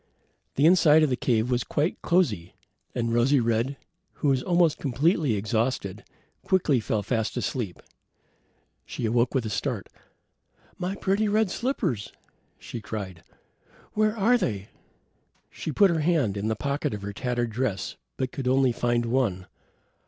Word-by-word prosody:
The 140 - +3
inside 160 -3 +6
of 150 - +2
the - - +3
cave 120 -1 +1
was 125 -1 +1
quite 150 +4 -1
cosy, 170 - +1 0.4
and 115 -1 -1
Rosy 130 +4 +4
red, 115 +4 0 0.4
who 145 - 0
was 130 -2 +2
almost 170 0 +2
completely 145 - +1
exhausted, 110 0 -1 0.4
quickly 165 -9 +2
fell 110 -1 -1
fast 110 +1 -1
asleep. 110 -9 -3 1.0
She - - -5
awoke 120 +3 +1
with 130 -3 +1
a 110 - -3
start. 95 - -2 0.9
"My 185 +2 -2
pretty 200 +2 +1
red 210 -1 +2
slippers," 190 - -2 0.4
she 120 - -7
cried. 95 -6 -6 0.7
"Where 215 +1 +1
are 235 +4 +4
they?" 100 - -2 0.8
She - - -5
put 195 +5 +5
her 165 - 0
hand 150 - +1
in 100 +1 -2
the 110 - 0
pocket 140 -1 -2
of 100 - -8
her 100 0 -5
tattered 120 +1 -2
dress, 110 -4 -2 0.2
but 130 -1 -2
could 135 -2 -4
only 130 0 +4
find 120 0 0
one. 115 -7 0
125 Hz, 150 wpm, -26 LUFS, 110-160 Hz, 1.0 s, inside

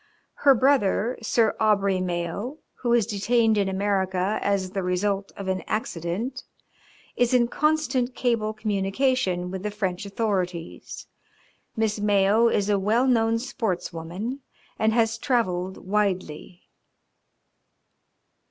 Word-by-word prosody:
Her 275 -2 +4
brother, 250 -3 +2
Sir 225 0 +2
Aubrey 200 -3 +2
Mayo, 180 - -3 0.2
who 240 - -1
is 235 -3 +4
detained 225 +1 +2
in 200 -2 +1
America 190 0 0
as 195 -2 0
the 195 - -2
result 195 +2 -1
of 195 - -6
an 185 0 -1
accident, 215 +6 -3 0.7
is 245 +1 +2
in 240 -1 +4
constant 270 -4 0
cable 230 -4 0
communication 205 -2 0
with 190 -1 -5
the 210 - -2
French 200 -2 -3
authorities. 185 -5 -3 0.7
Miss 220 -2 0
Mayo 205 +2 +3
is 205 -3 +1
a 205 -1 +2
well 220 +6 +2
known 230 -3 +3
sports 225 -8 -3
woman 180 +11 -5 0.4
and 220 0 +3
has 225 -1 +1
travelled 190 -9 0
widely." 185 -4 -2
210 Hz, 120 wpm, -25 LUFS, 190-235 Hz, 0.7 s, Her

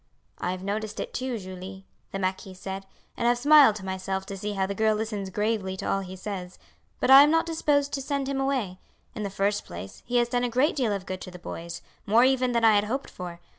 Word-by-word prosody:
"I - - -2
have 185 0 -4
noticed 210 +2 -3
it - - -5
too, 255 -2 -2
Julie," 190 0 -9 0.3
the - - -3
marquis 190 0 -3
said, 195 +1 -6 0.3
"and 235 - 0
have 240 0 +3
smiled 285 -3 +7
to 195 -3 -7
myself 190 0 -3
to 195 - -6
see 205 +2 -4
how 195 -1 0
the 200 - -3
girl 220 +1 +2
listens 210 -3 -3
gravely 205 -1 -1
to - - -4
all 195 - +1
he 190 -1 -7
says, 185 -2 -6 0.4
but - - +2
I 270 +1 +12
am 290 - +6
not 325 +1 +3
disposed 290 -3 +1
to 275 - -1
send 275 0 -2
him 270 -1 -1
away. 250 -10 -1 0.3
In 225 - -6
the 200 - -2
first 200 +1 0
place, 90 +3 -9
he 245 +1 +1
has 240 0 +3
done 245 0 0
a 245 - +1
great 260 +7 +2
deal 250 -7 +1
of 200 -2 -3
good 185 -1 -5
to - - -7
the 180 - -10
boys, 170 -1 -7 0.2
more 225 +4 +5
even 255 -1 +3
than 235 -1 +2
I 220 - +7
had 205 0 +3
hoped 265 +6 -3
for. 175 -2 -8
210 Hz, 245 wpm, -27 LUFS, 190-245 Hz, 0.4 s, I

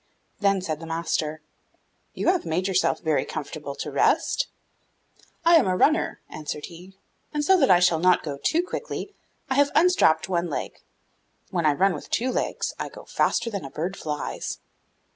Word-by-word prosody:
Then 195 -2 +2
said 155 -4 -3
the 165 - -8
master, 160 -2 -2 0.7
'You - - +1
have 360 -1 +2
made 170 +4 -1
yourself 185 -1 +1
very 160 -3 +1
comfortable 150 -2 -6
to - - -5
rest!' - - +2 1.0
'I 335 0 +8
am 305 - +3
a 185 0 +1
runner,' 310 - +2
answered 150 -1 -6
he; 180 +3 -13 0.4
'and 295 0 0
so 380 - +6
that 270 - +4
I 180 - +7
shall 175 -2 +3
not 180 +1 +4
go 140 -3 -5
too 335 +2 +2
quickly, 410 +1 -5 0.3
I - - 0
have 285 +1 +4
unstrapped 315 - +4
one 175 -2 -1
leg; 145 - -4 0.7
when 170 -4 +1
I 150 - +4
run 190 +5 +2
with 150 - -8
two 255 +3 0
legs, - - -2
I - - -3
go - - -12
faster 230 0 0
than 200 -6 -4
a 135 - -7
bird 175 +7 -3
flies. 150 -4 -4
180 Hz, 180 wpm, -25 LUFS, 155-230 Hz, 1.0 s, I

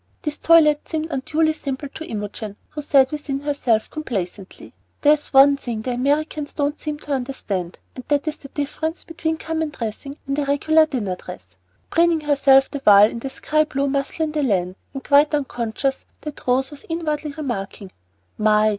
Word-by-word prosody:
These 300 -1 -4
toilettes 305 -3 +4
seemed 320 0 -3
unduly 315 +3 +1
simple 280 -2 -5
to 320 - -8
Imogen, 210 -1 -5 0.2
who 300 - -5
said 275 -2 +4
within 285 -2 -4
herself, 280 -6 0
complacently, 200 -10 -6 0.3
"There 295 0 +6
is 305 -1 -3
one 275 +1 +6
thing 230 -5 -5
the 255 - -2
Americans 285 +4 -1
don't 290 0 -1
seem 300 -1 -4
to 295 - -8
understand, 215 -9 -3 0.2
and 255 - -8
that 290 0 +1
is 310 - -2
the 275 - -11
difference 310 +4 -4
between 320 -1 -3
common 320 -1 -2
dressing 265 +2 -6
and 275 +1 -1
a 290 - 0
regular 315 +3 +3
dinner 205 -11 -3
dress," 90 - -11 0.4
preening 335 -1 +3
herself 275 -2 +4
the 285 - -4
while 205 +1 +7
in 235 - -6
the 270 - -5
sky 310 +3 +1
blue 280 -2 -1
mousselaine 280 +3 -1
de 300 0 -1
laine, 185 -8 0 0.2
and 270 -1 -7
quite 290 +2 +4
unconscious 265 -1 -2 0.2
that 300 -3 -8
Rose 265 +2 +2
was 290 - -11
inwardly 305 -3 -2
remarking, 205 -9 -5 0.5
"My! 215 0 +4
280 Hz, 175 wpm, -22 LUFS, 240-305 Hz, 0.5 s, while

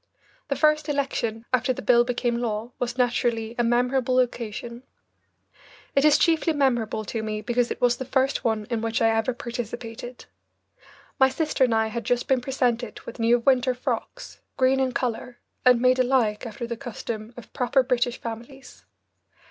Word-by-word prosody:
The 280 - -1
first 305 0 +2
election 240 -6 -2
after 255 +1 +2
the - - -7
bill 240 -1 +5
became 240 -1 -1
law 225 0 -3
was 245 0 -3
naturally 235 -2 0
a - - +3
memorable 250 +2 +1
occasion. 235 -1 -3 1.1
It 275 - +4
is 300 -1 +6
chiefly 325 0 +2
memorable 240 -6 0
to 225 +2 -3
me 215 -1 -3
because 240 +1 0
it - - -4
was 245 -1 +3
the 260 - -5
first 265 +1 0
one 220 -2 0
in 230 -2 0
which 225 0 -1
I 225 - +4
ever 225 +3 +1
participated. 240 0 -6 0.9
My 265 0 +6
sister 300 -1 +1
and 235 -3 0
I 220 0 +2
had 230 +1 -4
just 245 +3 0
been 265 -3 +2
presented 245 -3 -1
with 235 - -10
new 230 +1 +4
winter 255 0 +3
frocks, 250 - -5 0.2
green 265 0 +3
in 260 -1 +1
colour, 245 -1 -3 0.3
and 250 -2 +6
made 255 +1 +3
alike, 245 -3 +1
after 230 +2 -6
the 235 0 -4
custom 230 -2 -6
of 240 - -12
proper 260 +2 +2
British 245 -1 0
families. 235 +4 -9
245 Hz, 170 wpm, -25 LUFS, 230-260 Hz, 1.1 s, is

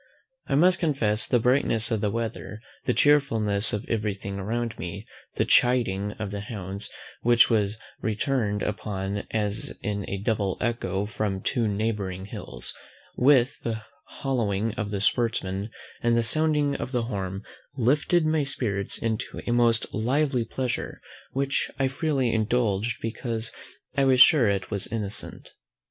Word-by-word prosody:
I - - +1
must 180 +5 +5
confess 115 -10 +1
the 125 - +3
brightness 120 -1 +2
of 110 -2 0
the 105 - +1
weather, 105 -3 -4 0.3
the 125 - +2
chearfulness 115 -8 +4
of 105 +1 -3
every 105 -3 -1
thing 100 0 -6
around 115 +3 -3
me, 100 +4 -5 0.3
the - - +1
CHIDING 110 -6 +3
of 105 -2 -5
the 100 - -4
hounds, 100 -1 -5 0.3
which 120 0 +5
was 105 -1 +1 0.2
returned 110 -2 0
upon 100 -1 -3
us 105 0 0
in 100 -1 -3
a 100 - -2
double 100 -2 -1
echo 100 -4 -1
from 105 -2 -2
two 120 -3 +1
neighbouring 100 -3 -2
hills, 105 - -7 0.4
with 130 -1 +4
the 110 -2 -4 0.2
hollowing 115 -5 -1
of 110 -2 -3
the 100 -2 -2
sportsmen, 105 -3 0 0.3
and 120 0 +3
the 115 - +3
sounding 150 +2 +2
of 125 - -5
the 120 -3 0
horn, 95 -4 -4 0.3
lifted 150 +7 +2
my 155 -1 +2
spirits 105 -8 -1
into 110 -1 -3
a - - -1
most 120 -1 +2
lively 130 +3 +1
pleasure, 125 +1 -3 0.3
which 135 +1 0
I 135 - +2
freely 135 -3 0
indulged 110 -1 +1
because 115 0 -3 0.4
I 140 -1 +3
was 130 -1 +4
sure 135 -5 +7
it 100 0 -2
was 100 -2 -1
innocent. 105 -2 -2
110 Hz, 150 wpm, -26 LUFS, 100-125 Hz, 0.4 s, sure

